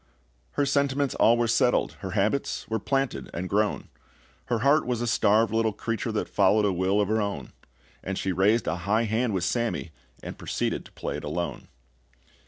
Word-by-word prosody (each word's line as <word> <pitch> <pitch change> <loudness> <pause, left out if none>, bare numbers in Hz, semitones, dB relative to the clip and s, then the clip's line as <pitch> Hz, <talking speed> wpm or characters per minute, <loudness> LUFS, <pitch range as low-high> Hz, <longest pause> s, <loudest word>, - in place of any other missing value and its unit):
Her 145 - +1
sentiments 140 0 +1
all 115 +1 +4
were 120 0 +1
settled, 115 +2 +2
Her 95 -2 -5
habits 110 +8 0
were 110 0 -1
planted 135 - -1
and 90 +2 -3
grown, 105 +2 0 0.6
Her 115 -3 -1
heart 150 +1 +4
was 125 -2 -1
a 120 - -1
starved 110 -1 +3
little 110 -1 +1
creature 115 +1 -3
That 110 - -2
followed 105 +2 +3
a 100 - +2
will 95 +3 +1
of 105 - +2
her 110 +1 +1
own; 100 -1 -4 0.5
And 95 0 -3
she 95 - -1
raised 100 +6 +2
a 80 - -1
high 105 +6 +1
hand 110 0 0
with 90 - -1
Sammy, 115 -5 -1 0.3
and - - -7
proceeded - - -2
to - - -15
play - - -4
it - - -8
alone. 85 +4 -4
110 Hz, 190 wpm, -26 LUFS, 95-120 Hz, 0.6 s, all